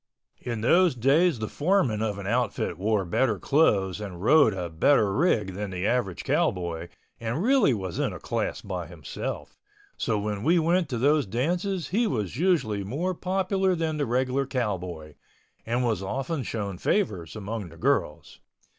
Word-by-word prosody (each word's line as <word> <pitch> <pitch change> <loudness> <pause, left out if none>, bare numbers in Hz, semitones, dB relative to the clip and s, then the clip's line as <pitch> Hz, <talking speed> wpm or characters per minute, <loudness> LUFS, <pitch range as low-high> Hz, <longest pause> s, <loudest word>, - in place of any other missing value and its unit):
In 115 -3 -4
those 175 +6 +4
days 140 +6 +3
the 110 -1 -3
foreman 145 - +1
of 105 -2 -1
an 100 - -7
outfit 115 -4 -1
wore 105 -1 +1
better 110 +5 +1
clothes 100 - +2
and 95 -4 -7
rode 140 - +5
a 90 -3 -4
better 100 - +3
rig 110 - +1
than 100 +2 -4
the 90 0 -3
average 105 - 0
cowboy 85 -2 0 0.3
and 115 +9 -2
really 260 - +4
was 95 -4 -5
in - - 0
a - - -8
class - - -2
by 90 -4 -5
himself, 80 -6 -6 0.4
so 110 - 0
when 105 -1 -3
we 170 +9 +3
went 170 0 +2
to 125 - -2
those 145 +2 +2
dances 175 - -1
he 225 +4 +2
was 105 - -2
usually 140 - +1
more 155 - -2
popular 190 +1 0
than 160 -2 -1
the 145 -3 -1
regular 130 +3 0
cowboy, 90 - -3 0.5
and 120 +2 0
was 110 -6 0
often 135 - -3
shown 100 -6 -4
favors 100 - -1
among 105 -2 -5
the 85 - -14
girls. - - -1
115 Hz, 165 wpm, -26 LUFS, 95-155 Hz, 0.5 s, rode